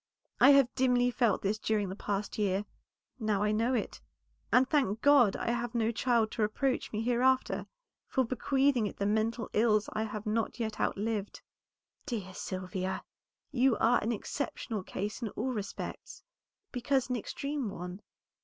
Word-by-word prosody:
I - - +8
have 275 -3 +5
dimly 250 -1 +3
felt 230 -3 +1
this 205 +2 0
during 210 -3 0
the 190 - -5
past 205 +1 -3
year, 200 0 +1 0.5
now 210 -3 +1
I 210 - +2
know 230 +4 +1
it, 225 - -3 0.5
and 255 +1 +5
thank 260 -8 +1
God 275 -8 +6
that - - -4
I - - +3
have 240 0 -2
no 230 -1 +2
child 235 -2 +1
to - - -3
reproach 255 +5 0
me 215 +1 -2
hereafter, 250 +2 +2 0.4
for 260 -2 +1
bequeathing 260 -1 +2
it - - -8
the 200 - -1
mental 220 +2 0
ills 215 -1 +2
I 215 +1 -1
have 215 0 -6
not 220 +3 -1
yet 220 -2 -3
outlived." 210 0 -2 0.6
"Dear 205 -8 -4
Sylvia, 185 0 -4 0.5
you 255 -3 +3
are 235 +2 +3
an 225 - -1
exceptional 225 -1 -3
case 205 +5 -5
in 230 - -2
all 255 +5 -1
respects, 205 -3 -6 0.5
because 260 +1 0
an - - +1
extreme 275 +2 -3
one. 180 +1 -7
225 Hz, 165 wpm, -31 LUFS, 210-250 Hz, 0.6 s, I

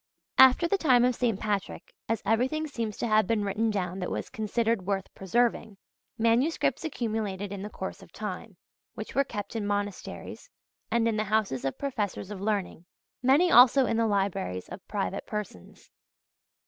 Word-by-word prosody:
After 265 +6 +7
the 395 +3 +1
time 250 -7 +5
of 250 - +2
St. 230 -4 0
Patrick, 205 -3 -3 0.2
as 225 -1 -1
everything 255 +9 +1
seems 230 -8 -4
to - - -2
have 215 -2 +3
been 210 -2 +1
written 215 +3 0
down 185 -3 -2
that 180 - -3
was - - -4
considered 220 -2 -1
worth 195 -1 -2
preserving, 220 +1 0 0.4
Manuscripts 235 +8 +2
accumulated 215 - -3
in 200 -1 -5
the 205 - -5
course 190 -2 -6
of - - -15
time, 205 0 -6 0.4
which 215 -2 -7
were 275 - +3
kept 210 -4 -6
in 210 -2 -2
monasteries 205 -1 -4 0.4
and 230 0 +2
in 225 -1 0
the 215 - 0
houses 195 - 0
of 135 - -2
professors 210 -7 -3
of 195 -2 -6
learning: 200 -4 -2 0.3
many 285 +8 +4
also 255 +2 +7
in 230 - 0
the 230 0 +2
libraries 195 - -1
of 190 - -10
private 200 -1 -3
persons. 210 - -7
215 Hz, 170 wpm, -28 LUFS, 195-235 Hz, 0.4 s, After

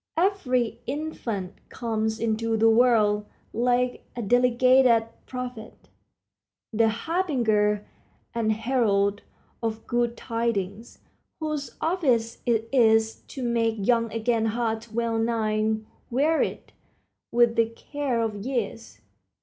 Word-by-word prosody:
Every 305 - +1
infant 240 -10 -4
comes 220 -2 -2
into 225 0 0
the 225 +1 +5
world, 215 -3 +3 0.3
like 245 +1 +1
a 240 - -3
delegated 245 +1 +4 0.2
prophet, 250 -3 -7 0.8
the 225 +1 +3
harbinger 225 - 0 0.5
and 225 -2 +1
herald 215 -3 +1 0.4
of 225 -1 -3
good 240 0 0
tidings, 230 -2 -3 0.4
whose 305 -3 -4
office 265 -10 +1
it 225 -1 +1
is 225 -3 +4
to 265 - -6
make 230 -2 +1
young 230 +2 +1
again 225 0 0
hearts 225 0 -2
well 230 0 -1
nigh 220 -1 +1 0.3
wearied 295 +6 0 0.6
with 235 -1 +4
the 230 -1 +3
cares 250 0 -2
of 200 -1 -7
years. 235 -3 -4
230 Hz, 105 wpm, -26 LUFS, 220-250 Hz, 0.8 s, the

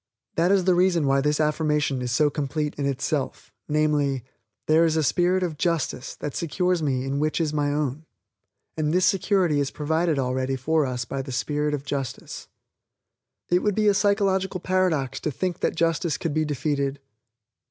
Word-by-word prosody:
That 170 +3 +2
is 195 -2 +4
the 185 0 +4
reason 175 -3 +3
why 135 0 +3
this 150 +1 +1
affirmation 150 -3 +1
is 125 -1 -2
so 145 +4 +3
complete 150 +1 -2
in 140 -1 -2
itself; 140 +1 -3 0.2
namely, 150 -4 +1 0.4
"There 160 +2 +4
is 160 -1 +2
a 160 - +2
spirit 180 +5 +2
of 160 -4 -3
JUSTICE 165 -6 -1
that 145 - -5
secures 180 +1 0
me 130 -4 0
in 135 +1 -2
which 155 +2 0
is 155 -2 0
my 145 -1 +1
own, 150 +1 -2 0.7
and 155 -1 0
this 185 - +4
security 185 -5 +2
is 140 -1 0
provided 160 +2 0
already 130 0 -1
for 150 +3 +1
us 125 -1 -3
by 135 +3 -3
the 135 0 -7
Spirit 150 +3 -1
of 140 -1 -8
Justice." 135 -4 -5 1.0
It 175 - +4
would 210 -2 0
be 215 -1 +2
a 205 - +6
psychological 195 -2 +1
paradox 175 -8 0
to - - -2
think 180 +4 -3
that - - 0
Justice 165 -1 0
could 165 - -3
be 155 0 +1
defeated. 140 -1 -1
150 Hz, 180 wpm, -25 LUFS, 140-175 Hz, 1.0 s, a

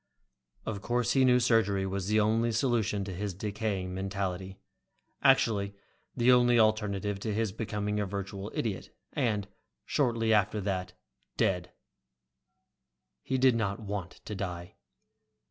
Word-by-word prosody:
Of 105 -2 -4
course 120 +2 0
he 135 - +4
knew 125 -1 +5
surgery 110 -5 +2
was 95 0 -3
the 110 +1 +3
only 110 +2 +2
solution 110 -3 +1
to 95 -1 -5
his 100 +1 -4
decaying 100 -2 -3
mentality, 95 0 -3 0.6
actually 105 -7 +3 0.4
the 120 +1 +5
only 120 -1 +5
alternative 105 -2 +1
to 110 +2 -3
his 110 -1 0
becoming 105 0 -2
a 105 - -1
virtual 100 +1 -5
idiot, 105 -5 -2 0.2
and, 105 -4 0 0.4
shortly 115 -5 +1
after 105 0 +2
that, 95 -2 -2 0.4
dead. 90 -2 +1
And 90 - -30 1.5
he 130 - -1
did 130 -2 +5
not 105 -2 -1
want 100 -4 -6
to 105 - -5
die. 90 -3 -5
105 Hz, 135 wpm, -30 LUFS, 95-115 Hz, 1.5 s, knew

